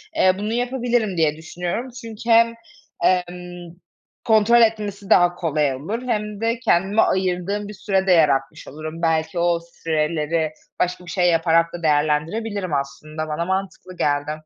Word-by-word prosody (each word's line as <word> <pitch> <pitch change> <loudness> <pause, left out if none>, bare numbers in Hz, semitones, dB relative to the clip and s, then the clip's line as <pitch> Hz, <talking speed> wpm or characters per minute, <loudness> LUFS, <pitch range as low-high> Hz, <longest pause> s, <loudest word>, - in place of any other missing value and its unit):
Eee, 185 -11 +4
bunu 210 +2 -3
yapabilirim 240 -5 0
diye 155 -2 +2
düşünüyorum, 175 +9 -4
çünkü 230 0 -8
hem, 230 0 +5 0.5
emm, 180 -1 -1 0.5
kontrol 225 +2 +5
etmesi 210 -3 0
daha 175 0 +5
kolay 150 -4 0
olur 200 - -4
hem 210 -3 -2
de 230 +1 0
kendime 205 -2 +2
ayırdığım 185 +2 0
bir 210 - -8
süre 195 -1 -1
de - - +4
yaratmış 145 -6 +2
olurum. 155 +3 -7
Belki 160 0 0
o 170 0 +2 0.2
süreleri 155 0 0 0.3
başka 180 0 -1
bir - - -10
şey 180 0 +2
yaparak 165 0 +2
da 175 -1 -7
değerlendirebilirim 160 +6 0
aslında. 150 +3 -4
Bana 155 +2 -2
mantıklı 190 -1 -4
geldi. 145 0 0
180 Hz, 145 wpm, -22 LUFS, 160-210 Hz, 0.5 s, hem